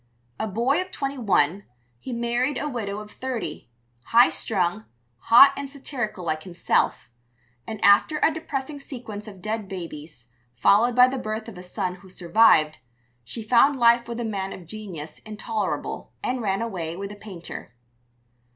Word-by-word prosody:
A - - -1
boy 240 - +1
of 370 - -6
twenty 275 -5 -4
one, 195 -4 +2 0.4
he 255 - -7
married 240 +3 0
a 295 - -2
widow 215 -7 -3
of 210 0 -8
thirty, 255 - -5 0.4
high 235 +1 +6
strung, 175 - -1 0.3
hot 255 - +8
and 280 -1 -5
satirical 245 -9 -5
like 155 -1 -1
himself; 170 -9 0 0.6
and 220 -2 -5
after 200 +10 +5
a 320 - +4
depressing 290 -2 -4
sequence 230 -6 -8
of 195 -4 -11
dead 215 -2 -3
babies, 155 -9 -8 0.3
followed 215 - +4
by 250 0 +8
the 265 +1 -3
birth 215 0 -4
of 225 - -9
a 180 - -9
son 180 0 -4
who 190 0 -16
survived, 175 -4 +4 0.4
she 220 - -6
found 250 +5 +4
life 235 -1 +4
with 235 0 -5
a 240 - -2
man 195 -3 -3
of 180 - -10
genius 180 -6 -8
intolerable, 215 0 -4
and 250 0 -1
ran 195 0 0
away 175 -7 -4
with 200 +1 -5
a - - -8
painter. 185 - -9
215 Hz, 160 wpm, -25 LUFS, 185-245 Hz, 0.6 s, hot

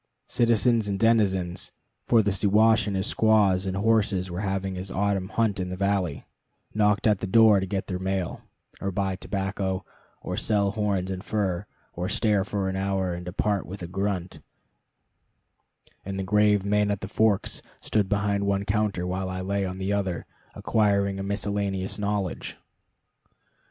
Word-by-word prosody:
Citizens 115 -1 +3
and 100 -1 -2
denizens 95 -6 +1 0.4
for 115 -2 +5
the 100 - +1
Siwash 105 +3 +3
with 100 - -1
his 95 +1 0
squaws 105 -5 +3
and 95 0 -2
horses 100 -3 +1
was 90 +2 -3
having 95 -1 -2
his 95 +1 -5
autumn 100 -1 0
hunt 110 -3 0
in 90 -1 -2
the 90 - -5
valley 95 -6 -1 0.5
knocked 105 -1 +2
at 105 -3 +3
the - - -3
door 110 0 +6
to 95 - -3
get 95 0 -2
their 90 -1 -4
mail, 95 -2 -2 0.4
or 100 - -1
buy 95 -1 -1
tobacco, 95 -1 -3 0.4
or - - -3
sell 100 -2 +1
horns 100 -3 -1
and 95 0 -5
fur, 100 -3 -1 0.3
or 90 +2 -3
stare 105 -1 +2
for 100 -1 -2
an 95 - -2
hour 95 -1 -1
and 90 +1 -6
depart 100 +2 -1
with 95 0 -7
a - - -4
grunt; 95 -1 -3 1.6
and 95 0 -5
the - - -1
grave 105 0 +3
Man 105 0 +2
at 100 -1 -1
the - - -4
Forks 110 -1 +1 0.2
stood 105 -3 0
behind 100 0 0
one 100 0 0
counter 100 -3 0
while 95 +1 -2
I 95 0 -4
lay 100 +1 -1
on 95 0 -5
the 95 +1 -1
other, 95 -4 -2 0.3
acquiring 100 -2 +1
a - - -3
miscellaneous 100 -1 -2
knowledge. 100 -3 -2
100 Hz, 165 wpm, -26 LUFS, 95-105 Hz, 1.6 s, door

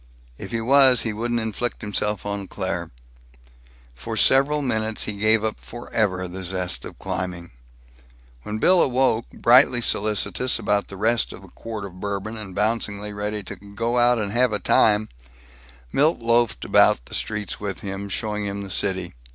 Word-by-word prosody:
If - - -7
he 115 -1 -2
was, 130 0 +5
he 110 - -2
wouldn't 120 +2 -1
inflict 110 +2 -3
himself 105 -1 -2
on 100 -1 -4
Claire. - - -4 1.0
For 110 - -6
several 140 +4 +4
minutes 110 -4 -1
he 105 - -3
gave 110 +1 +3
up 110 -1 -2
forever 105 -6 -2
the 95 +2 -7
zest 90 -8 -2
of - - -10
climbing. 90 -2 -5 0.9
When 105 - -5
Bill 180 +10 +4
awoke, 125 -3 +1
brightly 125 +1 +5
solicitous 110 +3 +1
about 105 -2 0
the 95 - -10
rest 115 +3 +1
of - - -11
the 95 - -14
quart 110 +1 -7
of 90 -2 -11
Bourbon, 100 +3 -4
and 105 -4 -8
bouncingly 105 -1 -1
ready 105 0 -4
to 90 - -7
"go 115 +4 -2
out 120 0 +4
and 105 -3 -2
have 120 0 +2
a - - +2
time," 105 +1 +3 0.8
Milt 155 +4 +3
loafed 115 0 +1
about - - +4
the - - -13
streets 105 -1 -3
with 100 -2 -5
him, 100 -1 -5
showing 105 0 -3
him 100 0 -4
the 100 - -7
city. 95 -2 -1
105 Hz, 165 wpm, -23 LUFS, 100-115 Hz, 1.0 s, was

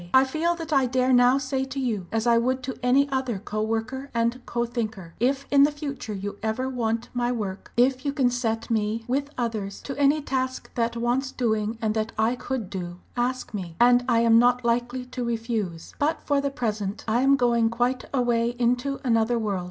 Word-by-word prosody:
I 260 - +8
feel 320 +6 0
that 330 -2 -5
I 270 -2 +4
dare 255 +1 +2
now 245 +1 +6
say 265 -1 -1
to 265 +1 -5
you, 220 -9 -2
as 225 0 0
I 235 -1 +5
would 255 +2 0
to 260 0 -4
any 265 +3 +4
other 260 -5 -1
co 215 +2 -4
worker 225 +5 -2
and 235 +2 0
co 235 0 -1
thinker 220 -8 -4
if 270 +4 +1
in 280 -1 +6
the 285 - +7
future 280 -7 -5
you 200 +1 -5
ever 220 +4 -1
want 230 -3 -2
my 245 0 0
work, 205 -5 -4
if 255 +1 +3
you 285 - 0
can 265 -4 +2
set 230 -2 -2
me, 220 +1 0
with 280 +3 -1
others, 220 -5 -3
to 275 - -5
any 285 +2 +4
task 260 -2 -3
that 235 0 -1
wants 245 +3 0
doing 220 -2 -1
and 215 -1 +1
that 220 0 -2
I 220 +3 +2
could 250 -4 -4
do 175 -2 -5 0.2
ask 250 0 -2
me, 180 -5 -5
and 245 +1 +6
I 230 -1 +4
am 230 0 +6
not 245 0 +3
likely 245 +2 0
to 250 0 -5
refuse. 225 -7 -3
"But 305 +3 0
for 285 -1 +1
the 280 - 0
present 215 -6 -3
I 230 +3 +2
am 275 +1 +5
going 235 -3 +2
quite 245 +2 0
away 240 -2 +1
into 250 +3 0
another 230 -1 +2
world. 210 -4 -1
240 Hz, 205 wpm, -25 LUFS, 225-260 Hz, 0.2 s, I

